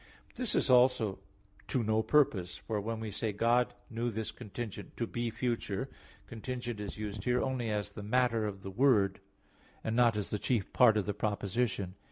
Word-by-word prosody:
But - - -21
this 250 - +1
also 125 -4 +5
is - - -11 0.5
to 125 - 0
no 110 0 +2
purpose; 105 -11 +2
for 105 -2 -3
when 115 +2 -3
we 110 -1 -4
say, 105 +2 -2
"God 120 +4 +2
knew 120 0 -2
this 110 -1 -3
contingent 110 -1 -7
to 120 - 0
be 120 +1 -2
future," 120 0 -2 0.3
contingent 120 -1 -5
is 105 0 -6
used 105 -2 -5
here 125 0 +2
only 130 -3 -1
as 105 -1 -2
the 105 - -8
matter 115 0 +2
of 95 -2 -6
the 95 - -5
word, 105 -4 +3 0.6
and 110 - -1
not 120 -3 +4
as 105 - -3
the 105 - -1
chief 115 -4 -1
part 115 -4 +6
of 105 - +1
the 105 - -1
proposition. 100 -1 -1
110 Hz, 190 wpm, -32 LUFS, 105-120 Hz, 0.6 s, part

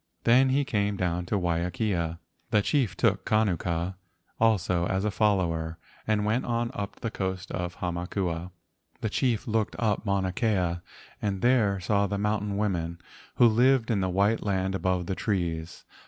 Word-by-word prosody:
Then 130 +3 +5
he 140 +2 +2
came 105 -5 0
down 90 -1 -1
to 105 - 0
Waiakea. 85 0 -1 0.3
The 105 -2 +3
chief 120 - +1
took 100 -5 +2
Kanuku 90 -4 0 0.5
also 90 -6 +2
as 95 +2 0
a 105 - +1
follower 85 -6 +1 0.3
and 105 -1 +1
went 110 +5 +1
on 120 0 -1
up 100 -1 -6
the 115 - -2
coast 95 -3 -3
to 90 -1 -2
Hamakua. 90 0 -3 0.5
The 110 - -1
chief 120 -4 0
looked 110 -1 0
up 110 -3 0
Mauna 100 -2 0
Kea 95 -8 0 0.4
and 100 -3 -2
there 115 -6 +3
saw 100 +2 +1
the 100 +1 -2
mountain 105 -1 -1
women, 85 -5 -1 0.4
who 120 - +6
lived 120 +1 +3
in 100 -3 +1
the 95 - 0
white 100 +5 +2
land 95 -2 0
above 95 -2 0
the 95 - -2
trees. 85 -5 -2
100 Hz, 160 wpm, -27 LUFS, 90-110 Hz, 0.5 s, who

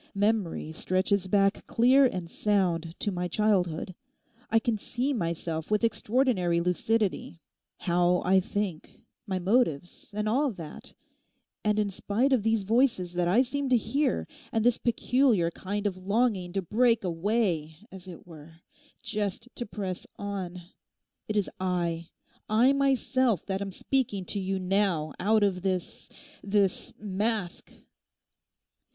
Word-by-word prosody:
Memory 200 -6 0
stretches 185 +3 0
back 195 +1 +2
clear 260 +4 +5
and 180 -7 -4
sound 175 -4 0
to 205 - -1
my 180 -1 -2
childhood. 185 -3 0 0.6
I 225 - +3
can 225 0 +1
see 250 +7 -2
myself 165 - -3
with 210 +1 +1
extraordinary 220 -5 +1
lucidity, 180 +1 0 0.4
how 175 0 +2
I 190 +1 +5
think, 190 -3 -4 0.2
my 190 -2 -1
motives 185 - 0
and 210 +1 -2
all 270 +6 +2
that; 165 -5 -10 0.7
and 210 0 +1
in 210 -2 +1
spite 230 +8 0
of 250 - +3
these 225 -1 +1
voices 225 -4 +1
that 175 0 0
I 220 +9 +4
seem 275 +2 -2
to 250 - +5
hear, 275 +4 0 0.2
and 225 -1 0
this 245 -1 +3
peculiar 235 -6 +2
kind 205 +4 -4
of 195 -3 -1
longing 200 -1 0
to 195 - -1
break 230 +4 +2
away, 175 -3 0 0.2
as 190 -1 -11
it 175 -3 -10
were, 160 -2 -13 0.5
just 210 +2 -3
to 240 - -5
press 190 -3 -5
on—it 195 +1 -7
is 205 - +1
I,—I 180 +7 0
myself, 260 - +1
that 195 0 -2
am 195 -1 -4
speaking 210 -4 -1
to 200 - -3
you 190 0 -1
now 185 -5 0
out 215 +2 +3
of 190 -3 +1
this—this 195 +1 -2
mask. 205 -1 -3
200 Hz, 135 wpm, -28 LUFS, 180-225 Hz, 0.7 s, clear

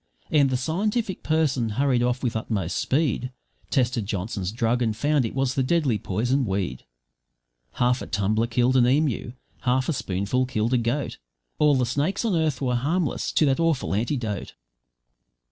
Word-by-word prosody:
And 145 -3 +4
the 130 - 0
scientific 195 - -1
person 150 -7 +1
hurried 135 -3 +2
off 125 +1 0
with 120 -3 -1
utmost 105 -6 -2
speed, 130 -3 0 0.4
Tested 120 -5 0
Johnson's 100 -1 -3
drug 120 +1 0
and 110 -3 0
found 145 0 +2
it 115 - -5
was 135 -1 0
a 135 - +2
deadly 135 -5 +1
poison 120 +9 0
weed; 95 - -3 0.9
Half 125 +1 +1
a - - -6
tumbler 110 +3 0
killed 125 +2 +2
an 120 -2 +5
emu, 135 -3 +1 0.3
half 130 +1 +1
a - - +2
spoonful 100 +3 -1
killed 115 0 -1
a 125 - +4
goat, 120 +5 -2 0.4
All 150 -2 +5
the 130 -1 +2
snakes 145 - -1
on 210 -5 +1
earth 155 -5 0
were 125 -1 +1
harmless 150 +7 0
to 155 - +4
that 135 +1 +2
awful 165 - +1
antidote. 110 -2 -2
125 Hz, 165 wpm, -25 LUFS, 115-145 Hz, 0.9 s, an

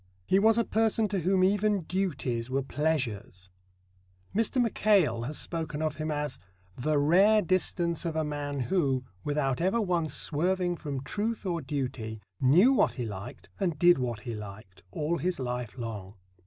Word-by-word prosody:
He 190 - +3
was 220 +2 +5
a 235 - +4
person 220 0 +2
to 195 -1 -1
whom 185 +2 +2
even 205 +1 +2
duties 140 -10 -2
were 135 +1 0
Pleasures. 125 - -2 0.8
Mr. 225 +4 +1
Mackail 195 - +2
has 150 +4 -3
spoken 160 -3 -3
of 155 -1 -2
him 155 0 -3
as 150 -3 -3 0.4
"the 150 +4 0
rare 195 +9 +5
distance 175 -2 0
of 165 -2 -3
a 160 - +1
man 145 -2 -3
who, 135 -5 +1 0.2
without 145 -3 0
ever 190 +6 +2
once 175 -7 0
swerving 175 +3 0
from 140 -5 -4
truth 215 +8 -3
or 170 -3 -1
duty, 130 -6 -4 0.2
knew 175 - +6
what - - +3
he 125 - -4
liked 105 +5 -8
and 175 -6 0
did 175 -1 +5
what 120 -4 -3
he 115 - -5
liked, 100 -3 -10
all 155 - -2
his 180 +2 -1
life 125 -2 -4
long." 105 -5 -6
155 Hz, 165 wpm, -29 LUFS, 130-185 Hz, 0.8 s, knew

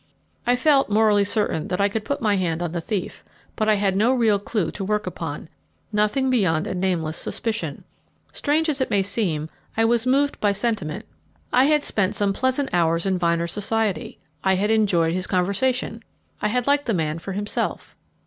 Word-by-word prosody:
I 245 - +4
felt 275 0 +3
morally 210 -1 +4
certain 205 -6 0
that 180 - -2
I 200 - +4
could 210 +1 -3
put 280 +1 -3
my 210 -2 +3
hand 175 -3 -1
on 175 - -3
the 170 0 -3
thief, 195 +1 -4 0.3
but 215 -1 0
I 215 - +5
had 200 -2 +1
no 230 +6 +3
real 220 -5 +3
clue 200 -4 -2
to 195 - -6
work 210 +2 -1
upon 165 -4 -5 0.5
nothing 210 +6 +1
beyond 180 -9 +2
a 200 - -3
nameless 180 -4 -1
suspicion. 225 0 -4 0.5
Strange 310 +2 +1
as 290 -3 0
it 260 - 0
may 200 -1 +2
seem, 185 -7 0 0.3
I 225 - +4
was 235 +1 +2
moved 280 +2 +2
by 205 -1 +2
sentiment. 205 -8 -2 0.5
I 255 +2 +5
had 300 0 +3
spent 200 0 0
some 200 -1 +1
pleasant 260 +4 0
hours 165 0 +2
in 190 -2 0
Vyner's 170 -1 0
society 210 0 -1 0.3
I 190 0 +3
had 205 +3 +1
enjoyed 180 -7 +2
his 185 +1 -2
conversation; 225 +6 0 0.4
I - - +2
had 245 +3 0
liked 285 0 +2
the 225 - +1
man 160 -1 -1
for 195 +3 -6
himself. 205 +2 -3
205 Hz, 190 wpm, -23 LUFS, 180-235 Hz, 0.5 s, I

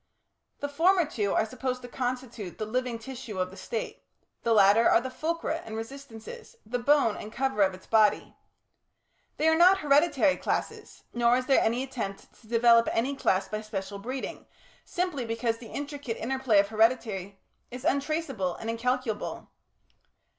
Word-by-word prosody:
The 285 - -1
former 340 +5 +3
two 210 -9 -1
are - - +3
supposed 255 +2 -4
to - - -7
constitute 245 -6 -4
the 215 - -3
living 250 +1 -2
tissue 235 -3 -8
of 185 0 -1
the - - -11
State; 210 +4 -5 0.4
the 230 - 0
latter 210 +1 +6
are - - +5
the 260 +2 -6
fulcra 330 +2 -2
and 220 - -7
resistances, 270 - -9
the 245 +3 -2
bone 275 -3 +3
and 210 - -8
cover 265 -3 -1
of 190 -1 +3
its 185 - -16
body. 215 -2 +2 1.0
They 315 - +2
are 320 - +5
not 360 +4 +6
hereditary 290 -1 +3
classes, - - -4
nor 240 +1 +3
is 255 - -2
there 270 - +4
any 235 +3 +1
attempt 230 -7 -6
to 225 - -19
develop 230 0 +5
any 260 +5 0
class 190 -7 +1
by 215 0 -4
special 200 -2 -5
breeding, 255 +6 -6 0.4
simply 355 -7 -2
because 230 0 -2
the 230 - -11
intricate 285 -4 -5
interplay 260 -2 +1
of 200 0 +4
heredity 215 -4 +1 0.3
is 250 +2 -8
untraceable 280 - -1
and 225 - -4
incalculable. 250 -1 -2
240 Hz, 160 wpm, -28 LUFS, 220-275 Hz, 1.0 s, latter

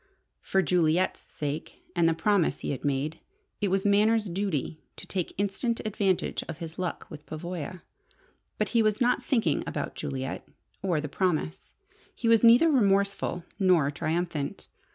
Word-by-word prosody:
For 190 0 +1
Juliet's 175 +2 +2
sake, 150 +1 -6
and 170 -1 +4
the 165 - +1
promise 170 -4 +2
he - - -2
had 135 - -4
made, 145 +3 -1 0.4
it 205 - +2
was 195 +1 0
Manners' 210 +2 +4
duty 170 -5 -2
to - - -7
take 185 -3 -3
instant 205 +4 0
advantage 200 -3 0
of 165 - -5
his 165 0 -7
"luck" 180 -2 -3
with 150 -1 -10
Pavoya. 170 +1 -6 0.7
But - - 0
he 235 - +3
was 215 0 +2
not 250 -1 +2
thinking 220 - +1
about - - -3
Juliet 130 0 -4 0.3
or 180 -5 +1
the 150 - -4
promise. 150 - -2 0.4
He 235 - -2
was 230 0 +5
neither 235 +8 +7
remorseful 200 - +2 0.2
nor 175 -7 +4
triumphant. 155 -1 -2
180 Hz, 155 wpm, -28 LUFS, 155-205 Hz, 0.7 s, neither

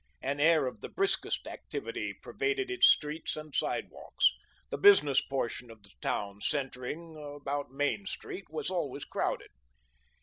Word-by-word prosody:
An 140 +2 -1
air 155 -1 +5
of 125 - -5
the - - -6
briskest 390 +1 0
activity - - -4
pervaded 400 -2 -2
its 380 - +6
streets 150 +1 +2
and 155 -1 -8
sidewalks. - - +1 0.4
The - - -2
business 150 - +7
portion 125 -2 -3
of 110 -2 -13
the 100 - -17
town, 100 0 -2
centring 145 +5 -3 0.2
about 145 0 -3
Main 145 +9 -1
Street, 195 0 -6
was 160 +4 -3
always 145 -6 -2
crowded. - - -2
145 Hz, 140 wpm, -31 LUFS, 135-170 Hz, 0.4 s, business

